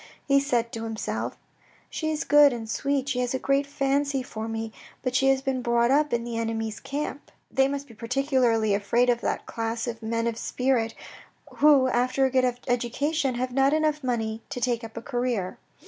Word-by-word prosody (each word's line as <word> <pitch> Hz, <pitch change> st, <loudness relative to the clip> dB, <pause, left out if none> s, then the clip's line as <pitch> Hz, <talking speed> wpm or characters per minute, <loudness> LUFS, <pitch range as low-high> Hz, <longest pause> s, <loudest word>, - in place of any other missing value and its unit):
He 275 Hz, -1 st, +5 dB
said 240 Hz, -4 st, 0 dB
to 225 Hz, -, -5 dB
himself, 225 Hz, -1 st, -3 dB, 0.3 s
" -, -, -31 dB
She 315 Hz, -, -2 dB
is 310 Hz, -1 st, -1 dB
good 290 Hz, -2 st, +6 dB
and 225 Hz, -2 st, -5 dB
sweet, 275 Hz, +4 st, -1 dB
she 260 Hz, -2 st, -1 dB
has 250 Hz, +1 st, 0 dB
a -, -, +2 dB
great 275 Hz, +2 st, +1 dB
fancy 280 Hz, -1 st, 0 dB
for 220 Hz, -2 st, -6 dB
me, 225 Hz, 0 st, -4 dB, 0.3 s
but 255 Hz, -1 st, -1 dB
she 270 Hz, +1 st, +3 dB
has 270 Hz, 0 st, +3 dB
been 265 Hz, -2 st, -1 dB
brought 235 Hz, 0 st, +2 dB
up 295 Hz, +2 st, +3 dB
in 235 Hz, 0 st, 0 dB
the 235 Hz, -1 st, -3 dB
enemy's 225 Hz, -1 st, -2 dB
camp. 290 Hz, 0 st, -5 dB, 0.2 s
They 270 Hz, 0 st, +3 dB
must 280 Hz, 0 st, -3 dB
be 230 Hz, -, -14 dB
particularly 235 Hz, -2 st, +1 dB
afraid 230 Hz, +5 st, +2 dB
of 240 Hz, 0 st, -1 dB
that -, -, -2 dB
class 230 Hz, 0 st, -3 dB
of 230 Hz, -1 st, -5 dB
men 230 Hz, +1 st, -1 dB
of 235 Hz, -1 st, -2 dB
spirit 250 Hz, -3 st, 0 dB, 0.6 s
who, 285 Hz, -3 st, +6 dB
after 255 Hz, +2 st, +2 dB
a 265 Hz, -, 0 dB
good 255 Hz, -1 st, +2 dB
education, 260 Hz, +3 st, 0 dB
have 250 Hz, +1 st, -2 dB
not 270 Hz, +2 st, +3 dB
enough 305 Hz, -1 st, +1 dB
money 225 Hz, -3 st, -1 dB
to -, -, -4 dB
take 240 Hz, -1 st, 0 dB
up 225 Hz, 0 st, -9 dB
a 230 Hz, -, -5 dB
career. 240 Hz, -8 st, -2 dB
250 Hz, 200 wpm, -26 LUFS, 230-275 Hz, 0.6 s, good